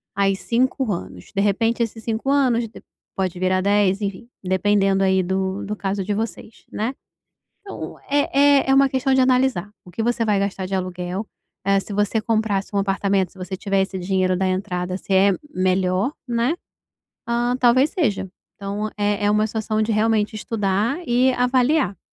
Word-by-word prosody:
Aí 195 Hz, 0 st, +2 dB
5 250 Hz, +2 st, 0 dB
anos, 170 Hz, -, -8 dB
de 195 Hz, -, +2 dB
repente 225 Hz, +4 st, +1 dB
esses 225 Hz, -1 st, -3 dB
cinco 225 Hz, +3 st, -2 dB
anos 255 Hz, -5 st, +2 dB
de -, -, -14 dB, 0.3 s
pode 185 Hz, -2 st, -2 dB
virar 185 Hz, 0 st, +1 dB
10 200 Hz, 0 st, +2 dB
enfim 200 Hz, +3 st, -4 dB, 0.2 s
dependendo 195 Hz, +1 st, +2 dB
aí 190 Hz, -1 st, +3 dB
do 190 Hz, +1 st, -2 dB
do 210 Hz, +1 st, -3 dB
caso 195 Hz, -1 st, -2 dB
de 205 Hz, -, -2 dB
vocês, 220 Hz, +1 st, -5 dB
né, 225 Hz, +5 st, -2 dB, 0.7 s
então 395 Hz, -1 st, -8 dB
é 285 Hz, 0 st, +4 dB
é -, -, 0 dB
é -, -, +6 dB
uma 275 Hz, 0 st, +5 dB
questão 265 Hz, 0 st, 0 dB
de 265 Hz, -, +4 dB
analisar 255 Hz, -6 st, +2 dB
o 180 Hz, -, -13 dB
que 225 Hz, -, -3 dB
você 235 Hz, 0 st, +1 dB
vai 210 Hz, -2 st, +2 dB
gastar 195 Hz, -1 st, -2 dB
de 195 Hz, -, -4 dB
aluguel. 185 Hz, +2 st, -3 dB, 0.4 s
Eh, 195 Hz, 0 st, +3 dB
se 205 Hz, -, -9 dB
você 205 Hz, +2 st, +1 dB
comprasse 215 Hz, -3 st, 0 dB
um -, -, +2 dB
apartamento 195 Hz, -1 st, 0 dB
se -, -, -18 dB
você 185 Hz, +1 st, -5 dB
tiver 195 Hz, 0 st, 0 dB
esse 190 Hz, 0 st, -4 dB
dinheiro 185 Hz, 0 st, +1 dB
da 190 Hz, +1 st, 0 dB
entrada 185 Hz, -1 st, -2 dB
se 195 Hz, -, -6 dB
é 195 Hz, +1 st, +5 dB, 0.2 s
melhor, 185 Hz, +5 st, +1 dB, 0.2 s
né, 240 Hz, +5 st, +1 dB, 0.7 s
hã, 240 Hz, +1 st, 0 dB
talvez 255 Hz, +3 st, +4 dB
seja. 210 Hz, -, -1 dB, 0.3 s
Então 200 Hz, +2 st, -4 dB
é 205 Hz, 0 st, 0 dB
é 205 Hz, -, +3 dB
uma 210 Hz, +1 st, +2 dB
situação 220 Hz, 0 st, -1 dB
de 215 Hz, -, -1 dB
realmente 215 Hz, 0 st, +1 dB
estudar 210 Hz, -, -1 dB
e 250 Hz, +2 st, +3 dB
avaliar. 250 Hz, -, +2 dB
205 Hz, 180 wpm, -22 LUFS, 190-235 Hz, 0.7 s, é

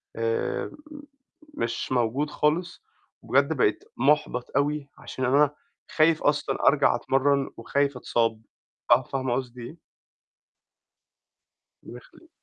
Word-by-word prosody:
آآ 115 Hz, 0 st, -2 dB, 0.8 s
مش 115 Hz, +2 st, -3 dB
موجود 125 Hz, +5 st, 0 dB
خالص، 165 Hz, -, -1 dB, 0.4 s
وبجد -, -, +2 dB
بقيت -, -, +1 dB
مُحبَط 145 Hz, -4 st, +1 dB
أوي 145 Hz, 0 st, -1 dB
عشان 130 Hz, -, -5 dB
أنا 145 Hz, +3 st, +3 dB, 0.4 s
خايف 160 Hz, 0 st, +3 dB
أصلًا 145 Hz, 0 st, 0 dB
أرجع -, -, +4 dB
أتمرّن 135 Hz, +1 st, +1 dB
وخايف 140 Hz, +3 st, -1 dB
أتصاب، 115 Hz, -2 st, 0 dB, 0.5 s
ف -, -, +11 dB
فاهمة 130 Hz, -2 st, 0 dB
قصدي 125 Hz, -2 st, -5 dB
إيه؟ 155 Hz, +8 st, -9 dB, 2.1 s
ربنا -, -, -10 dB
يخلّيكِ. 425 Hz, -9 st, -19 dB
140 Hz, 105 wpm, -26 LUFS, 125-150 Hz, 2.1 s, ف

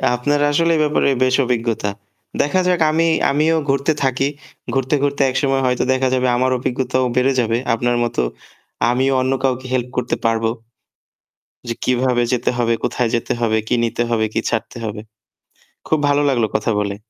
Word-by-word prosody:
আপনার 145 Hz, +4 st, 0 dB
আসলে 165 Hz, +3 st, +2 dB
এই -, -, +1 dB
ব্যাপারে 150 Hz, -2 st, +1 dB
বেশ 130 Hz, 0 st, +2 dB
অভিজ্ঞতা। 115 Hz, -3 st, -1 dB, 0.5 s
দেখা 165 Hz, +6 st, +1 dB
যাক 180 Hz, -1 st, +2 dB
আমি 165 Hz, +2 st, +2 dB, 0.3 s
আমিও 155 Hz, +3 st, +2 dB
ঘুরতে 140 Hz, +2 st, +1 dB
থাকি। 135 Hz, +1 st, +1 dB, 0.5 s
ঘুরতে, 135 Hz, +2 st, +1 dB
ঘুরতে 140 Hz, 0 st, 0 dB
একসময় 135 Hz, +1 st, 0 dB
হয়তো 125 Hz, -1 st, +1 dB
দেখা 130 Hz, 0 st, +1 dB
যাবে 130 Hz, 0 st, +1 dB
আমার 130 Hz, +1 st, +1 dB
অভিজ্ঞতাও 130 Hz, +1 st, -1 dB
বেড়ে 130 Hz, +2 st, +3 dB
যাবে। 115 Hz, -1 st, +1 dB, 0.2 s
আপনার 120 Hz, +1 st, 0 dB
মতো 120 Hz, -, -1 dB, 0.7 s
আমিও 130 Hz, +2 st, +1 dB
অন্য 130 Hz, +1 st, 0 dB
কাউকে 130 Hz, -1 st, 0 dB
হেল্প 125 Hz, -1 st, -1 dB
করতে 125 Hz, -1 st, 0 dB
পারব। 115 Hz, 0 st, +1 dB, 1.3 s
যে, 115 Hz, -, -1 dB
কিভাবে 125 Hz, -1 st, +1 dB
যেতে 125 Hz, -1 st, +1 dB
হবে, 115 Hz, -1 st, +2 dB
কোথায় 125 Hz, 0 st, 0 dB
যেতে 115 Hz, -, -1 dB
হবে, 110 Hz, -1 st, +1 dB
কি -, -, +1 dB
নিতে 115 Hz, +1 st, -1 dB
হবে, 115 Hz, -2 st, +1 dB
কি -, -, +1 dB
ছাড়তে -, -, -3 dB
হবে। 105 Hz, 0 st, -5 dB, 0.9 s
খুব 155 Hz, -, +1 dB
ভালো 145 Hz, 0 st, +2 dB
লাগলো 120 Hz, -4 st, +2 dB
কথা 115 Hz, -, 0 dB
বলে। 100 Hz, -1 st, -2 dB
125 Hz, 170 wpm, -19 LUFS, 120-135 Hz, 1.3 s, বেড়ে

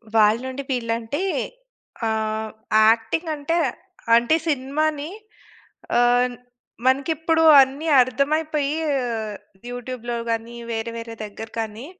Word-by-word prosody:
వాళ్ళ 215 Hz, +1 st, +5 dB
నుండి 260 Hz, +2 st, -5 dB
వీళ్ళంటే, 230 Hz, +4 st, -2 dB, 0.9 s
ఆహ్, 220 Hz, 0 st, -2 dB, 0.4 s
యాక్టింగంటే 295 Hz, +8 st, 0 dB, 0.6 s
అంటే 235 Hz, +6 st, +4 dB
సినిమాని 295 Hz, +2 st, -1 dB, 0.9 s
ఆహ్, 245 Hz, +1 st, +3 dB, 0.5 s
మనకిప్పుడు 320 Hz, +5 st, +2 dB, 0.2 s
అన్ని 275 Hz, +5 st, -1 dB
అర్థమైపోయీ 290 Hz, +3 st, 0 dB, 0.2 s
ఆహ్, 225 Hz, -4 st, -3 dB, 0.4 s
యూట్యూబ్‌లో 245 Hz, -1 st, -5 dB
గానీ, 230 Hz, +1 st, -2 dB, 0.2 s
వేరే, 225 Hz, 0 st, -3 dB
వేరే 230 Hz, 0 st, -7 dB
దెగ్గర 215 Hz, +1 st, -8 dB
కానీ, 220 Hz, +2 st, -5 dB
245 Hz, 90 wpm, -23 LUFS, 225-285 Hz, 0.9 s, వాళ్ళ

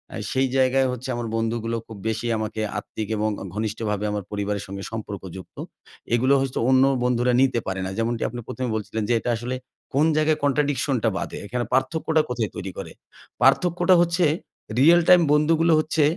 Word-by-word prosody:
এ -, -, -4 dB
সেই 130 Hz, 0 st, +2 dB
জায়গায় 130 Hz, 0 st, +3 dB
হচ্ছে 125 Hz, +1 st, -6 dB
আমার 120 Hz, -1 st, -3 dB
বন্ধুগুলো 115 Hz, 0 st, -1 dB
খুব 110 Hz, -, -9 dB
বেশি 115 Hz, +2 st, -2 dB
আমাকে 110 Hz, 0 st, -3 dB, 0.2 s
আত্মিক 105 Hz, 0 st, -6 dB
এবং 110 Hz, +1 st, 0 dB, 0.3 s
ঘনিষ্ঠভাবে 105 Hz, -1 st, -2 dB
আমার 105 Hz, -2 st, -3 dB
পরিবারের 100 Hz, -1 st, -2 dB
সাথে 100 Hz, 0 st, -7 dB
সম্পর্কযুক্ত। 95 Hz, -4 st, -7 dB, 0.6 s
এগুলো 130 Hz, +3 st, +3 dB
হচ্ছে 135 Hz, -1 st, -2 dB
অন্য 130 Hz, 0 st, +5 dB, 0.2 s
বন্ধুরা 125 Hz, 0 st, +2 dB
নিতে 130 Hz, -3 st, +3 dB
পারে 95 Hz, 0 st, -2 dB
না। 95 Hz, -, -3 dB
যেমনটি 115 Hz, 0 st, -1 dB
আপনি 120 Hz, +1 st, -7 dB
১ম 130 Hz, 0 st, -4 dB
এ 110 Hz, -, -2 dB
বলছিলেন। 110 Hz, 0 st, -3 dB
যে -, -, +3 dB
এটা 120 Hz, -, -3 dB
আসলে 125 Hz, +3 st, -4 dB, 0.4 s
কোনো 150 Hz, +4 st, +3 dB
জায়গায় 155 Hz, 0 st, +2 dB
কন্ট্রাডিকশন 140 Hz, -1 st, +1 dB
টা 115 Hz, -, +4 dB
বাধে। -, -, -5 dB
এখানে 120 Hz, +2 st, -2 dB
পার্থক্যটা 155 Hz, +4 st, +2 dB
কোথায় 115 Hz, -4 st, -1 dB
তৈরি 95 Hz, 0 st, -5 dB
করে? -, -, -6 dB, 0.5 s
পার্থক্যটা 180 Hz, +1 st, +4 dB
হচ্ছে 175 Hz, +1 st, +2 dB, 0.5 s
রিয়াল 170 Hz, +5 st, +6 dB
টাইম 180 Hz, -1 st, +8 dB
বন্ধুগুলো 160 Hz, +2 st, +3 dB
হচ্ছে 155 Hz, 0 st, +1 dB
125 Hz, 175 wpm, -24 LUFS, 110-145 Hz, 0.6 s, টাইম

